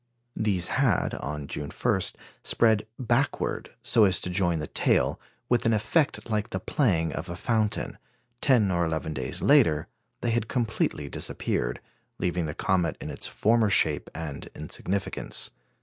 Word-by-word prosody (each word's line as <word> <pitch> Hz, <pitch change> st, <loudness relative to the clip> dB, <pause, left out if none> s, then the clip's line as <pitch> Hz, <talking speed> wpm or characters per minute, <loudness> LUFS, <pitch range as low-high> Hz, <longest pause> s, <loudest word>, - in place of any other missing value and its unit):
These 95 Hz, -5 st, +1 dB
had, -, -, +2 dB
on 75 Hz, +1 st, -4 dB
June 70 Hz, +1 st, -5 dB
1, -, -, 0 dB, 0.4 s
spread 110 Hz, -2 st, +3 dB
backward 125 Hz, -, 0 dB
so 110 Hz, -, +5 dB
as 95 Hz, -1 st, +3 dB
to 90 Hz, -, -2 dB
join 90 Hz, -2 st, +2 dB
the 75 Hz, -, -3 dB
tail, -, -, +1 dB, 0.3 s
with 120 Hz, -1 st, +2 dB
an 115 Hz, -, +4 dB
effect 130 Hz, +8 st, +1 dB
like 105 Hz, -2 st, -1 dB
the 95 Hz, -, -3 dB
playing 90 Hz, -, +1 dB
of 85 Hz, +2 st, -5 dB
a 85 Hz, -, -4 dB
fountain; 110 Hz, +2 st, -1 dB, 0.4 s
ten 115 Hz, -8 st, +4 dB
or 85 Hz, -1 st, +2 dB
eleven 80 Hz, -2 st, -2 dB
days 65 Hz, -2 st, -3 dB
later, 75 Hz, -1 st, +5 dB, 0.4 s
they 120 Hz, -, 0 dB
had 115 Hz, -1 st, 0 dB
completely 110 Hz, -, -1 dB
disappeared, -, -, -2 dB, 0.4 s
leaving 90 Hz, -2 st, -1 dB
the 75 Hz, -, -5 dB
comet 90 Hz, -5 st, +1 dB
in -, -, -5 dB
its -, -, -2 dB
former 110 Hz, 0 st, +3 dB
shape -, -, +2 dB
and 75 Hz, -3 st, -6 dB
insignificance. 100 Hz, +1 st, -2 dB
95 Hz, 150 wpm, -27 LUFS, 80-110 Hz, 0.4 s, so